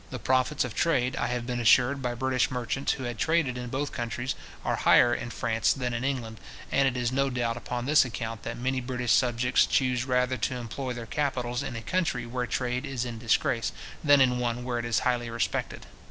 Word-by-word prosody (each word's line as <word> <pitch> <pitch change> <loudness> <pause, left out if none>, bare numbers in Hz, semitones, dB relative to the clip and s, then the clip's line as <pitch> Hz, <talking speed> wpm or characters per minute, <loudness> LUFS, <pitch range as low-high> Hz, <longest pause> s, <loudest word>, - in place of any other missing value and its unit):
The 130 - -5
profits 130 +4 +1
of 125 -3 -5
trade, 130 -6 +1
I - - -1
have 125 -1 -2
been 120 -1 -2
assured 125 +4 +4
by 125 -1 -2
British 130 0 +1
merchants 125 +2 -1
who 130 - -6
had 120 -3 -4
traded 160 -6 +1
in 125 -1 -5
both 140 +3 -2
countries, 120 0 -3 0.3
are - - 0
higher 120 - +5
in 120 - -3
France 115 -2 +1
than 125 -2 -3
in 120 +1 -2
England; 120 -5 -3 0.3
and 135 0 +3
it 130 -1 -1
is 120 -1 0
no 135 +1 +1
doubt 120 -2 -1
upon 120 +1 -4
this 150 +2 +5
account, 115 -2 -5
that 115 0 -5
many 130 +2 -1
British 125 -2 -2
subjects 125 +1 +3
chuse 125 -2 +1
rather 125 0 +1
to 120 +3 -1
employ 125 +2 -4
their 120 -1 -6
capitals 125 -3 -1
in 135 - -5
a 115 - -6
country 160 -7 -1
where 125 +1 -3
trade 125 0 -1
is 125 -2 -3
in 120 -2 -6
disgrace, 115 0 +1 0.3
than 145 -2 +6
in 125 -1 +3
one 120 0 -1
where 120 -1 -2
it 120 - -4
is 120 -1 +1
highly 120 -2 0
respected. 115 -1 -2
125 Hz, 215 wpm, -27 LUFS, 120-130 Hz, 0.3 s, than